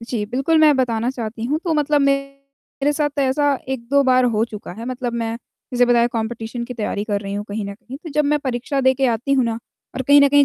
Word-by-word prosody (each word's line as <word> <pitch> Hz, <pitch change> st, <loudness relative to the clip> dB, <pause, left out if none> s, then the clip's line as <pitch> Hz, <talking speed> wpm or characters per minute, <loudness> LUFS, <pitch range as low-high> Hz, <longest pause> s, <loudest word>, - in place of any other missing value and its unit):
जी, 230 Hz, -2 st, -3 dB
बिल्कुल 270 Hz, +8 st, +1 dB
मैं 305 Hz, -2 st, +6 dB
बताना 240 Hz, -2 st, 0 dB
चाहती 230 Hz, -2 st, -5 dB
हूँ 290 Hz, +6 st, 0 dB
तो 335 Hz, -, +1 dB
मतलब 295 Hz, 0 st, +2 dB
मेरे 275 Hz, +1 st, -2 dB
साथ 290 Hz, -1 st, -1 dB
ऐसा 285 Hz, +2 st, +2 dB, 0.2 s
1-2 265 Hz, +2 st, +1 dB
बार 255 Hz, -1 st, +4 dB
हो 215 Hz, -, +2 dB
चुका 210 Hz, -5 st, -8 dB
है, 225 Hz, +5 st, -8 dB
मतलब 250 Hz, -1 st, -3 dB
मैं 230 Hz, -1 st, -2 dB, 0.4 s
जैसे 245 Hz, 0 st, +4 dB
बताया 240 Hz, -1 st, +4 dB
कम्पटीशन 225 Hz, +1 st, -3 dB
की 250 Hz, +1 st, -7 dB
तैयारी 210 Hz, -2 st, -2 dB
कर 205 Hz, -2 st, -1 dB
रही 200 Hz, -1 st, -5 dB
हूँ 205 Hz, -, -3 dB
कहीं 210 Hz, +1 st, -3 dB
न 200 Hz, 0 st, -6 dB
कहीं, 245 Hz, +4 st, -10 dB
तो 330 Hz, +3 st, -10 dB
जब 300 Hz, +1 st, +1 dB
मैं 295 Hz, +1 st, +2 dB
परीक्षा 265 Hz, +1 st, -2 dB
देके 260 Hz, 0 st, +3 dB
आती 240 Hz, +4 st, 0 dB
हूँ 265 Hz, -2 st, +3 dB
ना 230 Hz, -1 st, -2 dB, 0.4 s
और 260 Hz, -, -2 dB
कहीं 285 Hz, +2 st, +6 dB
न 280 Hz, -, +6 dB
कहीं 285 Hz, 0 st, +5 dB
255 Hz, 235 wpm, -20 LUFS, 230-280 Hz, 0.4 s, मैं